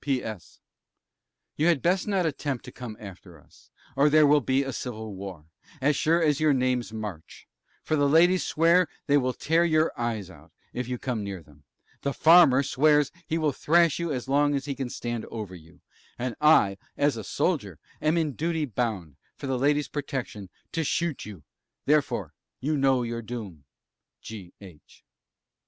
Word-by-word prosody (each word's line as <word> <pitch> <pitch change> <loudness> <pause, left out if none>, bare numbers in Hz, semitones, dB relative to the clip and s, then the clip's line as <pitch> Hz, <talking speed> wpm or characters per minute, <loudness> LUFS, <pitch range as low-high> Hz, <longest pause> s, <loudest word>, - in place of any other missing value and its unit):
P.S. 110 - -4 1.0
You 155 - +2
had 165 -6 +2
best 185 +4 +1
not 195 -4 +1
attempt 140 -4 -3
to - - -9
come 115 -4 -8
after 95 -5 -12
us, - - -23 0.3
or 140 +2 +4
there 155 0 +6
will 145 0 +5
be 130 +2 +1
a 135 -1 -5
civil 110 -4 -6
war, 95 -5 -8 0.3
as 145 +2 +2
sure 165 +3 +2
as 150 -2 +2
your 155 -2 +3
name's 125 -3 0
March; 105 -7 -8 0.4
for 155 - 0
the 145 -1 +2
Ladies 175 +4 +4
swear 170 +2 +3 0.2
they 145 - +3
will 130 -3 +2
tear 165 +3 +2
your 160 -1 +2
eyes 115 -5 -3
out, 80 0 -17 0.2
if 125 -1 -4
you 125 0 -3
come 120 -4 -3
near 95 -4 -6
them,; 75 -1 -22 0.4
the 140 -1 -2
Farmer 155 -5 +6
swears 150 +1 +3 0.2
he 160 - -1
will 155 -2 +1
thrash 170 +2 +2
you 170 -2 -2
as 130 -2 -4
long 145 +1 +2
as 135 -1 -3
he 140 - -3
can 135 -2 -4
stand 120 -2 -4
over 105 -5 -7
you; 85 0 -15 0.4
and 125 -1 -3
I 100 -11 +4 0.2
(as 145 -2 +2
a 110 - -6
Soldier) - - -1 0.2
am 155 +2 +2
in 160 -3 +1
duty 160 +2 -1
bound, 105 - -3 0.2
for - - -8
the 130 -2 -1
Ladies' 145 +2 +2
protection, 130 -9 -5 0.2
to 165 - -1
shoot 165 0 -1
you 100 -8 -10 0.4
therefore 150 0 +1 0.3
you 150 +4 -1
know 135 -3 +2
your 115 0 -4
doom. 105 - -8 0.5
G. 100 -6 -9
H. 90 -7 -16
135 Hz, 180 wpm, -26 LUFS, 110-150 Hz, 1.0 s, there